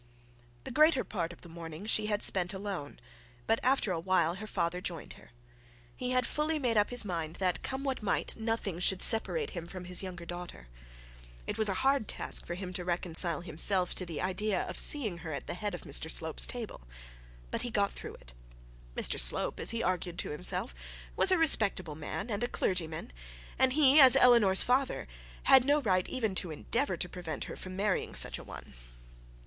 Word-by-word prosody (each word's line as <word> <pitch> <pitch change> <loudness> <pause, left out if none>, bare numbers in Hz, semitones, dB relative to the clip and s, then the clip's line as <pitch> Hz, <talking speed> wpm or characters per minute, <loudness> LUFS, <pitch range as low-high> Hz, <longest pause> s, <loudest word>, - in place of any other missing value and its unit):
The - - -8
greater 305 +1 +3
part 170 -5 -5
of 175 - -15
the - - -14
morning 165 +2 -10
she 215 -1 +1
had 210 -1 -1
spent 180 0 +1
alone; 190 -7 -6 0.5
but 225 - +1
after 255 -6 +1
a 170 - -2
while 175 -1 0
her 205 +4 -9
father 180 -2 -3
joined 170 -4 -6
her. - - -19 0.7
He 250 - -4
had 255 0 0
fully 310 +1 -2
made 245 -6 -1
up 210 -1 +2
his 245 -3 +1
mind 165 -4 -5
that, 185 -2 -1
come 265 +1 -5
what 270 -3 -3
might, 210 - -2
nothing 220 -6 -4
should 185 +1 +3
separate 440 - +3
him 170 -3 -7
from 180 0 -9
his 180 0 +2
youngest 180 -3 -9
daughter. 175 - -9 0.8
It - - -6
was 215 -1 +3
a 195 - -2
hard 270 -5 +1
task - - -3
for 175 - -5
him 185 0 -8
to 180 - -5
reconcile 170 -2 +2
himself 180 +2 +6
to - - -2
the 170 -3 -6
idea 190 +2 -2
of - - -5
seeing 215 - +3
her 160 -2 -7
at 140 - -6
the - - -5
head 205 +1 -5
of - - -10
Mr 155 +1 +3
Slope's 160 -1 +3
table; 235 - -7 0.7
but - - -3
he 245 - -4
got 205 -3 -1
through - - -9
it. - - -13 0.6
Mr - - 0
Slope, - - +1
as - - 0
he 230 0 -2
argued 180 -1 -3
to - - -5
himself, 150 +5 0 0.4
was 385 - +3
a 370 - +3
respectable 205 - +5
man 160 +9 -6
and 205 +3 -3
a - - 0
clergyman; 160 - -3 0.5
and 260 -1 +3
he, 290 0 +5
as 265 -3 +8
Eleanor's 230 -6 +5
father, 260 +2 -1 0.4
had 265 -2 +6
no 290 +3 +2
right 185 -9 -1
even 225 -6 -3
to 185 -1 -1
endeavour 230 - -3
to 180 - -1
prevent 175 -5 -7
her - - -8
from 185 0 -8
marrying 200 0 -2
such - - +3
a - - -11
one. - - -12
190 Hz, 200 wpm, -30 LUFS, 175-235 Hz, 0.8 s, as